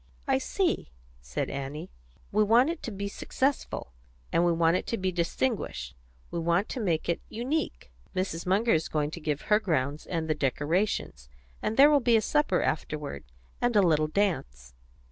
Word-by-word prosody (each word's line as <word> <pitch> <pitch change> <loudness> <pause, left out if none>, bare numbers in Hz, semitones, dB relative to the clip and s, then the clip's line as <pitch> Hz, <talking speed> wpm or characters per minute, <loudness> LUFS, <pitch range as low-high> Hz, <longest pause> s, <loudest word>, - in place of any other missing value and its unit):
"I - - +3
see," - - 0 0.3
said - - -3
Annie. 140 +2 -5 0.4
"We 215 +1 +4
want 240 +8 +5
it 340 - -7
to 235 - -5
be 200 0 -4
successful, 260 - -2 0.4
and 170 - +4
we 175 - +4
want 165 0 +3
it - - -2
to 230 - -1
be 185 -2 0
distinguished; 170 - -2 0.4
we 170 - -2
want 170 +4 +1
to 260 - -4
make 170 -8 0
it 170 - 0
unique. 240 - -3 0.2
Mrs. 185 -2 -2
Munger 210 +5 +3
is 160 0 +1
going 150 -1 0
to 170 - -7
give 150 -2 -1
her 210 0 +3
grounds 150 -7 -1
and 165 -2 -2
the 155 - +2
decorations, 150 - -1 0.3
and 220 - -2
there 285 +2 +8
will 290 - +6
be 240 -3 +4
a - - +2
supper 295 -10 +2
afterward, 150 - -3 0.4
and 245 -1 +1
a 205 - +6
little 155 -3 +3
dance." 65 - -1
170 Hz, 180 wpm, -28 LUFS, 150-215 Hz, 0.4 s, there